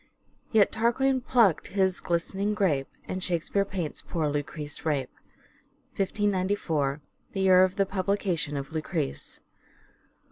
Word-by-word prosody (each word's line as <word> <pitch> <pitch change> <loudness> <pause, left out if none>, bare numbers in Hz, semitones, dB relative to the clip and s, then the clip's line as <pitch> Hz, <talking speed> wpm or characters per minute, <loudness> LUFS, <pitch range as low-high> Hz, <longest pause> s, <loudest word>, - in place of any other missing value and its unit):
" - - -38
Yet 215 -3 +5
Tarquyne 255 +4 +2
pluckt 230 - +3
his 190 -2 +1
glistering 195 +4 -1
grape, 155 -10 +1 0.2
And 185 0 -3
Shake 170 -3 0
speare 200 -1 +1
paints 180 -6 -4
poore 155 -4 -2
Lucrece 145 0 -4
rape." 145 -5 -1 0.8
Only 195 - +1
as - - -17
(1594. 185 -8 0 0.3
The 195 - -3
year 185 -1 +6
of 185 0 +1
the 195 - +2
publication 185 -6 -1
of 135 0 -5
" - - -22
Lucrece.") 70 - -3
185 Hz, 145 wpm, -27 LUFS, 155-200 Hz, 0.8 s, year